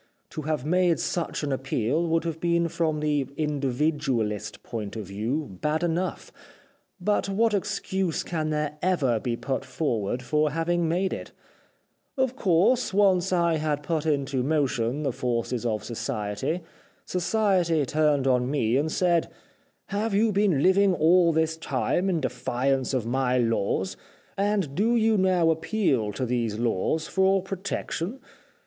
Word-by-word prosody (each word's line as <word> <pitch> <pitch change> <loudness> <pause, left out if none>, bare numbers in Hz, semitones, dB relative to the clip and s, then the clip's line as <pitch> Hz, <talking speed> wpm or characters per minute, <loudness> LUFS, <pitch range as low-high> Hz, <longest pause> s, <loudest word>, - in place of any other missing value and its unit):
To 155 - -5
have 150 -3 -2
made 180 +1 +2
such 170 -3 -2
an 145 - -1
appeal 135 +4 0
would 165 0 +1
have 165 -1 -4
been 170 0 +1
from 155 -2 -1
the 145 -3 0
individualist 140 -6 -1
point 110 -3 -5
of 110 -2 -5
view 105 - -3
bad 155 +2 0
enough, 175 +2 -2 0.7
but 200 +2 0
what 220 +3 +2
excuse 190 -3 -1
can 155 -3 -2
there 150 -1 -2
ever 145 -11 +1
be 120 +1 -2
put 135 +1 -2
forward 125 -4 -2
for 150 +3 +1
having 165 +2 0
made 185 +3 0
it? - - -7 0.8
Of 260 -1 +1
course, 195 +2 +2
once 190 -3 +3
I 170 -2 +2
had 150 -1 -1
put 160 0 -1
into 140 -3 0
motion 135 -2 0
the 140 - 0
forces 120 -1 -2
of 110 -2 -2
society, 115 - -3 0.4
society 180 -4 +1
turned 150 -2 +2
on 125 -1 +2
me 125 -4 +1
and 155 +3 0
said, 175 -2 +2 0.3
* - - -42
Have 220 -1 -1
you 220 +2 +3
been 200 -1 +2
Uving 190 +5 +3
all 170 +2 +5
this 160 0 0
time 160 +5 0
in 170 -4 0
defiance 130 +1 -1
of 120 -4 -1
my 125 +1 +1
laws, 115 -5 0 0.4
and 200 -7 0
do 220 +8 +2
you 225 -1 +3
now 185 -4 +3
appeal 160 - 0
to 130 - -2
these 115 -3 -1
laws, 120 +7 0
for 190 0 +2
protection 195 +3 -4
155 Hz, 150 wpm, -26 LUFS, 130-180 Hz, 0.8 s, all